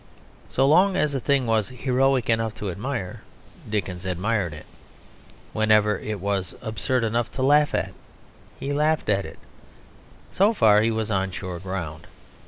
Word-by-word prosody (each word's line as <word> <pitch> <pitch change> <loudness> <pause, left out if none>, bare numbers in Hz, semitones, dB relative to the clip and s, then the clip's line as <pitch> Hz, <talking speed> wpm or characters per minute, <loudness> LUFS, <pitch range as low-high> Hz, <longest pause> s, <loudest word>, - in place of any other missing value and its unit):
So 135 - +2
long 185 +6 +5
as 150 -6 +1
a 135 - 0
thing 135 +1 +1
was 110 -3 +1
heroic 130 0 +1
enough 115 -1 0
to 105 -3 -4
admire, 105 -1 -4 0.5
Dickens 95 -4 -3
admired 95 0 -1
it; 75 0 -10 0.9
whenever 105 -2 +3
it 105 -2 -4
was 95 -2 -2
absurd 115 +2 -1
enough 115 +1 -1
to 130 - -2
laugh 145 +2 +4
at - - -2 0.7
he 140 - -3
laughed 150 0 +1
at 100 -2 +2
it: - - -10 0.9
so 205 +4 +3
far 105 - +5
he 110 - +2
was 110 -1 -2
on 95 -1 0
sure 90 -1 -6
ground. 90 -5 -6
110 Hz, 155 wpm, -24 LUFS, 95-135 Hz, 0.9 s, long